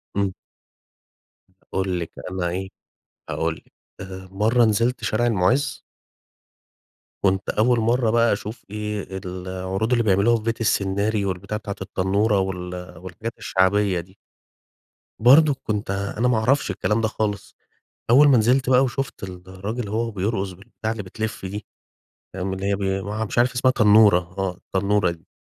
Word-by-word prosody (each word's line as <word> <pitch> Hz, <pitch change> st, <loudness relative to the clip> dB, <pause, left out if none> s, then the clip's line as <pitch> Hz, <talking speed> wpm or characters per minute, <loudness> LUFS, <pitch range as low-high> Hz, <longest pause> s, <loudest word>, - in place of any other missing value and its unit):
امم. 100 Hz, -2 st, 0 dB, 1.3 s
هاقول 95 Hz, -2 st, -2 dB
لِك 85 Hz, -, -5 dB, 0.2 s
أنا 90 Hz, -2 st, -1 dB
إيه، 95 Hz, +2 st, -4 dB, 0.6 s
هاقول 80 Hz, 0 st, -1 dB
لِك، -, -, -20 dB, 0.3 s
آآ 95 Hz, 0 st, -8 dB
مرة 110 Hz, +5 st, +3 dB
نزلت 115 Hz, +3 st, +1 dB
شارع 110 Hz, +2 st, +1 dB
المُعز 120 Hz, +7 st, +1 dB, 1.4 s
كنت 95 Hz, 0 st, +1 dB
أول 120 Hz, +2 st, +3 dB
مرة 115 Hz, +1 st, +2 dB
بقى 115 Hz, 0 st, +3 dB
أشوف 105 Hz, +2 st, -6 dB
إيه، 105 Hz, -1 st, -4 dB, 0.2 s
العروض 95 Hz, +4 st, -3 dB
اللي 120 Hz, -1 st, +3 dB
بيعملوها 105 Hz, +3 st, +3 dB
في 110 Hz, -, -8 dB
بيت 115 Hz, 0 st, -2 dB
السنّاري، 100 Hz, 0 st, +1 dB
والبتاعة 100 Hz, +3 st, -3 dB
بتاعة 100 Hz, -2 st, -5 dB
التنورة 100 Hz, +3 st, +1 dB
وال 90 Hz, -2 st, -5 dB
والحاجات 95 Hz, +6 st, -7 dB
الشعبية 95 Hz, 0 st, +2 dB
دي. 95 Hz, +4 st, -11 dB, 1.0 s
برضه 140 Hz, +5 st, +6 dB
كنت 105 Hz, -2 st, -2 dB
أنا 100 Hz, +4 st, -1 dB
ما 125 Hz, -3 st, +3 dB
أعرفش 125 Hz, +1 st, +2 dB
الكلام 105 Hz, +3 st, 0 dB
ده 110 Hz, -, +2 dB
خالص، 105 Hz, -2 st, -3 dB, 0.6 s
أول 145 Hz, +4 st, +7 dB
ما 135 Hz, -3 st, +6 dB
نزلت 125 Hz, +4 st, +2 dB
بقى 130 Hz, +1 st, +5 dB
وشفت 130 Hz, -2 st, -4 dB
الراجل 95 Hz, +5 st, -6 dB
وهو 115 Hz, +2 st, -1 dB
بيرقص 100 Hz, -1 st, -2 dB
بالبتاعة 110 Hz, +4 st, -5 dB
اللي 115 Hz, -, -5 dB
بتلف 105 Hz, +1 st, -5 dB
دي، 105 Hz, +3 st, -6 dB, 0.7 s
آمم، 95 Hz, 0 st, -3 dB
اللي 95 Hz, +1 st, -3 dB
هي 100 Hz, -, +1 dB
بي 95 Hz, 0 st, -1 dB
ما 100 Hz, +2 st, -5 dB
ع 110 Hz, +1 st, -1 dB
مش 110 Hz, -, -4 dB
عارف 120 Hz, +1 st, +4 dB
اسمها 130 Hz, +1 st, +3 dB
تنورة 105 Hz, -4 st, +6 dB, 0.2 s
آه، 95 Hz, -2 st, -1 dB
التنورة 100 Hz, 0 st, 0 dB
دي. 85 Hz, -1 st, -10 dB
105 Hz, 150 wpm, -23 LUFS, 95-115 Hz, 1.4 s, أول